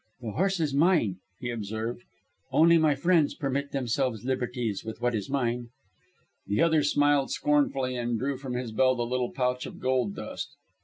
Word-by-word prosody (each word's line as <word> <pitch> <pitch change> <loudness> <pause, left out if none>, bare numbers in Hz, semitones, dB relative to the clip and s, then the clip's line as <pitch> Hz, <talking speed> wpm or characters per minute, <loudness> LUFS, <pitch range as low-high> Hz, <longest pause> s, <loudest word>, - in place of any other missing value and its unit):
"My 115 -3 -5
horse 190 - 0
is 150 -4 0
mine," 145 - +3 0.2
he 120 -1 -3
observed. 110 +1 -4 0.5
"Only 165 +1 +6
my 155 -2 +3
friends 165 0 +2
permit 140 0 -2
themselves 125 -3 -1
liberties 125 -5 -2
with 110 0 -7
what 120 0 0
is 105 -4 -3
mine." 120 -3 -1 0.8
The 100 +2 0
other 160 -2 +4
smiled 145 -1 +3
scornfully 135 -3 +1
and 120 -1 -1
drew 135 +3 -2
from 130 -1 -6
his 125 -2 -3
belt 130 +3 +3
a 120 - 0
little 125 0 -1
pouch 125 -1 -1
of - - -10
gold 130 -5 0
dust. - - -6
130 Hz, 170 wpm, -28 LUFS, 120-145 Hz, 0.8 s, Only